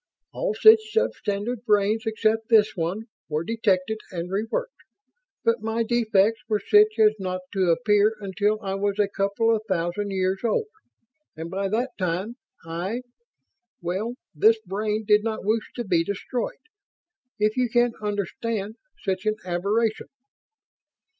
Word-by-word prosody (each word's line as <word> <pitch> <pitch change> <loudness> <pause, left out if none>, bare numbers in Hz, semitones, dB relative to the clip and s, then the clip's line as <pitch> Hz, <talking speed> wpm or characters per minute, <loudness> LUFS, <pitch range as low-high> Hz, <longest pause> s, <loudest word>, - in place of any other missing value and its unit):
All - - -2
such 440 0 +9
sub 450 +2 +1
standard 210 +3 -3
brains 215 0 +2
except 220 0 0
this 215 -3 +4
one 180 +5 -2 0.3
were 155 +1 -1
detected 220 0 0
and 175 -1 -5
re 205 +3 -1
worked, - - -3 0.7
but 230 -1 +2
my 225 +1 -1
defects 225 -2 +2
were 210 -1 +2
such 215 +2 +4
as 215 -1 +5
not 185 -1 -3
to 190 -3 +1
appear 210 +3 +3
until 205 +2 0
I 195 -1 -2
was 200 +1 -1
a 205 -1 +3
couple 200 +3 +1
of 215 - -3
thousand 180 +3 -1
years 190 0 0
old, 235 - +1 0.7
and 165 +1 -6
by 195 +1 -1
that 240 +5 -1
time 185 +6 -2 0.3
I... 180 +9 -4 0.8
well, 195 +7 -3 0.2
this 220 +9 +5
brain 210 +3 -2
did 210 0 +4
not 220 -3 -3
wish 215 +1 0
to 240 - -3
be 175 -6 +2
destroyed... 200 +6 -3 0.8
if 215 +1 +1
you 250 -2 +1
can 240 0 +2
understand 210 +1 -3 0.3
such 190 +2 -2
an 215 - +2
aberration." 205 +5 0
210 Hz, 145 wpm, -25 LUFS, 190-225 Hz, 0.8 s, such